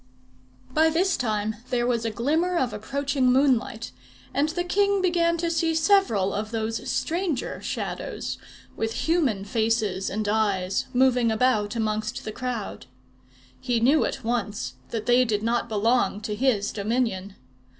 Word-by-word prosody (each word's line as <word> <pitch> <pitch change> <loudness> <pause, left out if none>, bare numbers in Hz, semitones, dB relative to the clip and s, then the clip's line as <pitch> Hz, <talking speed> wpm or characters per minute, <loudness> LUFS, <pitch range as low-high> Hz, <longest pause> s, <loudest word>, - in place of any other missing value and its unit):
By 315 +4 +4
this 350 +3 +2
time 215 -3 -1
there 240 -1 +1
was 235 -2 0
a - - +1
glimmer 315 - 0
of 250 -8 0
approaching 270 +4 0
moonlight, 250 -4 +1 0.4
and 290 +3 +1
the 350 +2 -2
king 400 +2 +2
began 345 -2 +2
to 335 0 -1
see 330 -1 +1
several 320 - +3
of 210 +1 -3
those 225 0 -3
stranger 335 -5 -2
Shadows, - - -4 0.4
with 225 0 -2
human 280 - +1
faces 220 -3 0
and 210 +2 -2
eyes, 200 -3 0
moving 250 -2 +3
about 220 -2 +1
amongst 215 0 -2
the 215 - -3
crowd. 230 - -5 0.7
He 240 - 0
knew 270 +7 +4
at 270 - -3
once 210 - -2 0.2
that 220 -2 -4
they 245 +1 +5
did 215 -3 -1
not 235 +1 0
belong 220 0 +1
to 215 0 -3
his 210 -3 +1
dominion. 205 -3 -1
235 Hz, 145 wpm, -25 LUFS, 215-280 Hz, 0.7 s, they